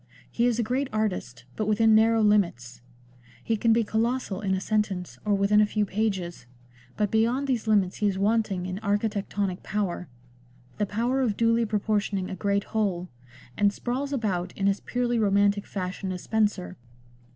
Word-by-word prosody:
He 235 +1 +2
is 240 -2 +1
a 235 - +1
great 260 +5 -1
artist, 190 - -2
but 215 - -2
within 220 +1 +4
narrow 225 +1 +4
limits; 170 - +1 0.6
he 225 - 0
can 225 +2 +2
be 230 +1 +4
colossal 220 -2 -1
in 190 -2 0
a - - -1
sentence 195 -3 -2
or 205 -1 +2
within 200 +2 +4
a - - +5
few 210 0 0
pages, 190 - -2 0.5
but 210 -2 0
beyond 235 +5 +2
these 245 -5 -1
limits 200 -4 +2
he 210 - +1
is 195 -2 0
wanting 205 -2 +1
in 185 +1 -4
architectonic 205 -2 -1
power 195 -4 -3 0.4
— 125 0 -29
the 210 - +1
power 240 +6 0
of 220 -6 0
duly 230 0 +3
proportioning 205 -2 -1
a - - -3
great 200 +1 0
whole 190 -6 -2 0.2
— 125 0 -21
and 205 -1 +4
sprawls 255 +6 -3
about 190 -9 -2
in 195 - -1
as 200 0 +1
purely 240 -1 -1
romantic 200 -1 +2
fashion 185 0 -4
as 180 -1 -6
Spenser. 210 - 0
210 Hz, 175 wpm, -26 LUFS, 190-225 Hz, 0.6 s, a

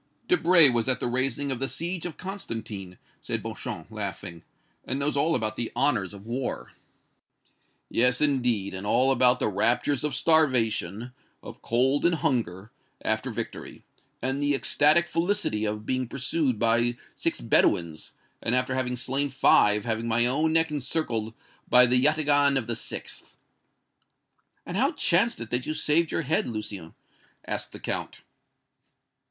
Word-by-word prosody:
"Debray 170 -2 +6
was 120 -1 +1
at 130 - +2
the - - -3
raising 135 +3 -1
of 130 - -3
the 135 - -1
siege 175 +3 -2
of 165 - -10
Constantine," 110 - -7 0.2
said - - -4
Beauchamp - - -7
laughing, 100 -5 -6 0.4
"and 130 - -3
knows 145 +2 -1
all 155 +4 +2
about 110 -2 -2
the 120 - -3
honors 120 -10 +1
of 100 0 -12
war." 125 +3 -4 1.1
"Yes, 125 +1 +2
indeed, 125 -9 +1
and 95 +2 -6
all 130 +5 +3
about 125 -1 +4
the - - 0
raptures 115 +7 +1
of 150 - -1
starvation, 120 - +1 0.3
of - - -11
cold 130 +5 +1
and 170 0 +3
hunger, 110 - -2 0.3
after - - -1
victory, - - -6 0.4
and 135 +2 -1
the 145 0 +1
ecstatic 150 +5 +3
felicity 165 - -1
of 105 0 -4
being 130 +1 -1
pursued 135 0 -1
by 120 +2 +1 0.2
six - - -2
Bedouins, 80 -2 +1 0.3
and 115 - +1
after 125 0 0
having 130 -1 -1
slain 135 +4 -2
five 105 -6 +3
having 115 0 -2
my 115 +1 +2
own 150 +6 +1
neck 160 0 +2
encircled 125 -6 -2 0.3
by 125 0 +7
the 125 +1 +3
yataghan 145 -2 +3
of 130 - -2
the 115 - -3
sixth!" - - -6 1.3
"And - - -6
how - - +2
chanced - - +2
it 115 - -8
that 125 0 -2
you 155 - -2
saved 155 +2 +1
your - - -1
head, 150 +3 0
Lucien?" 105 -7 -6 0.5
asked - - -3
the - - -10
Count. - - -4
125 Hz, 155 wpm, -26 LUFS, 110-145 Hz, 1.3 s, by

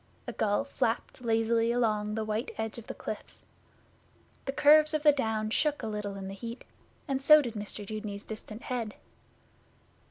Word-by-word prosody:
A - - -4
gull 205 +3 +1
flapped 245 -3 -2
lazily 230 0 +2
along 215 -3 +1
the 220 -1 -1
white 215 +2 -2
edge 220 +1 -3
of 225 - -13
the - - -6
cliffs. - - -7 1.0
The 270 - -1
curves 305 +2 +6
of 305 - -1
the 300 - +8
Downs 220 -5 -1
shook 300 -1 +1
a - - -2
little 210 -2 -4
in 195 -1 -6
the 195 - -6
heat, 230 +4 -7 0.4
and 270 -2 -1
so 305 +2 +9
did 245 -6 -2
Mr 210 -1 -5
Dudeney's 210 -1 -5
distant 215 +1 -8
head. 235 -4 -3
225 Hz, 170 wpm, -30 LUFS, 215-260 Hz, 1.0 s, so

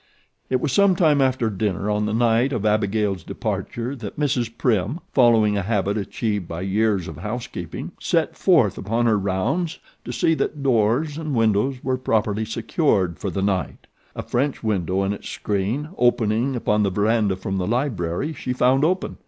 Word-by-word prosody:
It 130 - +1
was 140 +1 -1
some 200 -2 +4
time 155 -5 +3
after 130 -3 +1
dinner 100 -1 -2
on 105 0 0
the - - -1
night 120 +3 +2
of 110 -4 -2
Abigail's 105 -2 +1
departure 120 +9 -4
that 110 +2 -7
Mrs. 130 -5 0
Prim, 115 - 0
following 115 -5 +4
a - - +1
habit 100 0 0
achieved 105 -2 -2
by 85 +1 -5
years 100 -1 +1
of 80 - -8
housekeeping, 105 -2 -5
set - - 0
forth - - +3
upon 115 +5 0
her 110 -3 +3
rounds 115 - -1 0.3
to - - -6
see 165 - +2
that 150 -2 -2
doors 130 +5 +1
and 155 -4 -3
windows 115 +4 +1
were 130 -1 0
properly 110 -3 0
secured 110 - 0
for 100 - -3
the 95 +2 -2
night. 95 -6 -2 0.3
A - - -4
French 135 +2 -1
window 95 -3 0
and 95 +1 0
its 100 - -8
screen 105 +9 -2
opening 120 +1 +2
upon 105 -3 +1
the 100 - +2
verandah 105 0 +1
from 95 0 -3
the 90 - -2
library 120 - -1
she 125 -2 -4
found 130 +2 +3
open. 185 +4 0
110 Hz, 175 wpm, -22 LUFS, 100-130 Hz, 0.3 s, some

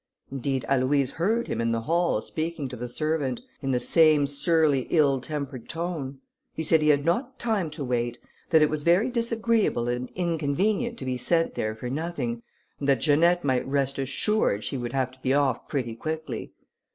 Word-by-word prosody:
Indeed 135 -1 -2
Aloïse 135 0 +2
heard 220 +8 0
him - - -2
in 115 0 +1
the 115 - -1
hall 170 -3 +1
speaking 160 0 -3
to 125 - -6
the 125 +1 -5
servant, 145 -1 -1 0.2
in 135 - -3
the 125 -2 +2
same 155 +2 +4
surly 145 -1 +2
ill 140 -5 +3
tempered 140 -3 -5
tone. 160 -6 -4 0.3
He 160 - -2
said 160 0 +4
he 155 - +3
had 145 -1 +3
not 245 +10 0
time 215 -8 -1
to 150 -1 -6
wait; 120 -1 -1 0.3
that 160 -2 +5
it 150 - +3
was 155 -1 -1
very 180 - +3
disagreeable 230 - +1
and 125 +1 -2
inconvenient 180 - 0
to - - -6
be 130 -1 -1
sent 165 +6 +1
there 110 0 -2
for 115 +3 -6
nothing; 130 -5 -3 0.4
and 140 - -1
that 135 - +4
Janette 170 +4 +4
might 130 -3 0
rest 140 0 0
assured 135 - +1
she - - -3
would 120 -2 -4
have 130 -2 0
to 130 - -19
be 130 +1 +1
off 135 -4 +1
pretty 125 -6 -2
quickly. 155 +5 -5
145 Hz, 190 wpm, -26 LUFS, 130-170 Hz, 0.4 s, that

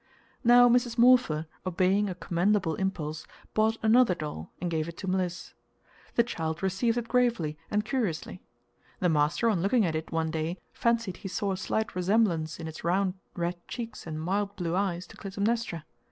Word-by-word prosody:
Now 245 0 +7
Mrs. 240 -1 +2
Morpher, 235 -11 +5 0.2
obeying 185 +3 +2
a 185 - -4
commendable 180 0 +1
impulse, 155 -4 -3 0.3
bought 220 +1 +2
another 220 -3 +5
doll 150 - -6
and 175 -1 -2
gave 160 -1 -1
it 170 - -8
to 190 - -6
Mliss. 185 -1 -2 0.6
The 235 - +5
child 160 -7 -4
received 210 +5 +1
it 235 -1 -2
gravely 235 -12 +1
and 210 0 0
curiously. 215 - -2 0.6
The 180 - +2
master 155 +8 +2
on 205 -7 +2
looking 210 +3 +3
at 165 - 0
it 155 +1 -4
one 160 -1 0
day 160 +2 -2 0.2
fancied 230 -5 0
he 200 - -7
saw 200 +1 -1
a - - 0
slight 220 +3 -2
resemblance 180 -4 +1
in 165 - -5
its 160 - -8
round 185 +2 +1 0.2
red 175 0 -2
cheeks 230 -7 -6
and 155 -1 -4
mild 200 +5 -1
blue 175 -3 -2
eyes 185 -2 -1
to - - -15
Clytemnestra. 200 -4 -2
190 Hz, 175 wpm, -28 LUFS, 165-220 Hz, 0.6 s, Now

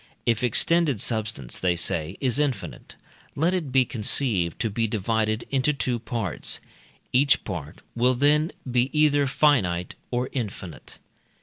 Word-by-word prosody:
If 115 -2 +1
extended 150 +1 +3
substance, 110 - -2
they 90 -1 +1
say, 85 0 -1
is 130 +1 +1
infinite, 145 -4 -3 0.4
let 165 +5 +1
it 165 -8 -2
be 130 -1 +4
conceived 105 - -1
to 115 - 0
be 115 +2 0
divided 110 +1 0
into 135 +2 +2
two 125 -4 -1
parts; 110 - -2 0.5
each 135 +2 +4
part 80 -7 -6
will 125 +2 +3
then 150 +5 +3 0.2
be 125 +1 +2
either 145 -2 +4
finite 125 - +2 0.2
or 125 +1 -1
infinite. 100 - -6
120 Hz, 135 wpm, -25 LUFS, 105-140 Hz, 0.5 s, be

